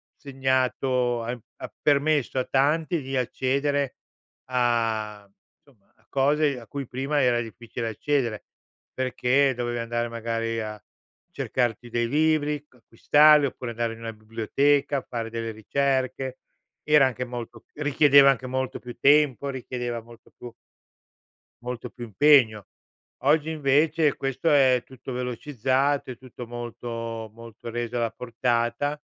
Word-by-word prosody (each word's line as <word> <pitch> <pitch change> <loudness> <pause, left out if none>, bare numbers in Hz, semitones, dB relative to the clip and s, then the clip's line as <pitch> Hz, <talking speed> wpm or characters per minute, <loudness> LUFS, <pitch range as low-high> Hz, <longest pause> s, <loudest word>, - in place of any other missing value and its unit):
segnato, 130 -3 0
ha 120 - -3
mhmm, 125 - -7 0.2
ha - - -8
permesso 145 -2 +2
a - - +1
tanti 155 +4 +1
di 135 0 -3
accedere 140 +2 0 0.6
a 115 -4 0 0.4
somma, 115 -9 -27
a - - -33
cose 140 0 +2
a 115 - -14
cui 140 -3 -6
prima 140 +3 -1
era 120 -1 +3
difficile 115 +1 -6
accedere. 120 -1 -1 0.5
Perché 130 +1 +2
dovevi 120 -1 -2
andare, 120 0 -2
magari, 115 0 -2
a 105 -1 -6 0.5
cercarti 120 -1 -2
dei 120 0 0
libri, 150 0 +1
c - - -27
acquistarli 145 +5 +5
oppure 125 -2 -6
andare 115 0 -2
in 115 - -12
una 115 0 -6
biblioteca, 135 +6 0
fare 115 -2 -5
delle 115 0 -3
ricerche. 130 +3 -1 0.4
Era 150 -2 +5
anche 125 0 -4
molto 120 -2 -8
richiedeva 145 -1 +5
anche 130 -1 -4
molto 130 0 -2
più 120 -1 -9
tempo, 140 0 +4
richiedeva 120 -3 -4
molto 115 0 -17
pu 120 -1 -10 1.1
molto 125 0 -5
più 120 +2 -8
impegno. 115 -3 +4 0.6
Oggi, 150 +2 +3
invece, 150 +1 +2
questo 135 +4 -1
è 130 -3 +5
tutto 130 0 -10
velocizzato, 130 +2 -1
è 125 - -9
tutto 125 -1 -10
molto 115 -1 -6
molto 115 0 -10
reso 120 +1 -3
alla 115 -1 0
portata. 120 +4 -1
125 Hz, 130 wpm, -25 LUFS, 115-140 Hz, 1.1 s, acquistarli